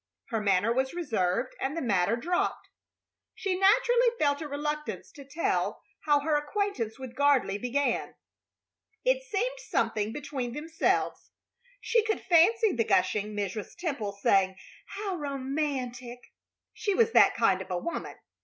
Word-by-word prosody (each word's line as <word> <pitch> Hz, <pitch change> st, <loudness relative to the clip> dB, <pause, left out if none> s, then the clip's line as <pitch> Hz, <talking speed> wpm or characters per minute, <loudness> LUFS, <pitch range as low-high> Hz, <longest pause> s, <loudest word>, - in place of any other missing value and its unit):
Her 225 Hz, -3 st, -1 dB
manner 205 Hz, +2 st, +2 dB
was 265 Hz, +4 st, -1 dB
reserved, 235 Hz, -, -1 dB
and 275 Hz, +4 st, -2 dB
the -, -, -1 dB
matter 200 Hz, -2 st, +2 dB
dropped. 345 Hz, +10 st, -2 dB, 0.7 s
She 385 Hz, -2 st, -1 dB
naturally 475 Hz, +5 st, +4 dB
felt 285 Hz, -4 st, +1 dB
a 310 Hz, -, -4 dB
reluctance 295 Hz, +1 st, -4 dB
to 285 Hz, -, -12 dB
tell 290 Hz, +5 st, -1 dB, 0.2 s
how 295 Hz, -2 st, +4 dB
her 305 Hz, +1 st, +1 dB
acquaintance 295 Hz, -, -2 dB
with 260 Hz, -2 st, -8 dB
Gardley 275 Hz, -8 st, +2 dB
began. 275 Hz, +3 st, -1 dB, 0.9 s
It -, -, +3 dB
seemed -, -, -2 dB
something 215 Hz, -, -1 dB
between 265 Hz, -3 st, -4 dB
themselves. 320 Hz, +3 st, -1 dB, 0.5 s
She 465 Hz, -2 st, +2 dB
could 440 Hz, 0 st, -1 dB
fancy 405 Hz, +6 st, +4 dB
the 235 Hz, -6 st, +1 dB
gushing 210 Hz, +1 st, +1 dB
Mrs. 205 Hz, 0 st, -4 dB
Temple 280 Hz, -, -3 dB
saying, 195 Hz, -1 st, +2 dB, 0.3 s
"How 395 Hz, -3 st, -4 dB
romantic!" 265 Hz, -4 st, -4 dB, 0.4 s
She 405 Hz, -2 st, -1 dB
was 460 Hz, +1 st, +3 dB
that -, -, +6 dB
kind 195 Hz, -5 st, +2 dB
of 190 Hz, -, -9 dB
a 180 Hz, -, -1 dB
woman. 340 Hz, -, -5 dB
285 Hz, 140 wpm, -28 LUFS, 230-350 Hz, 0.9 s, that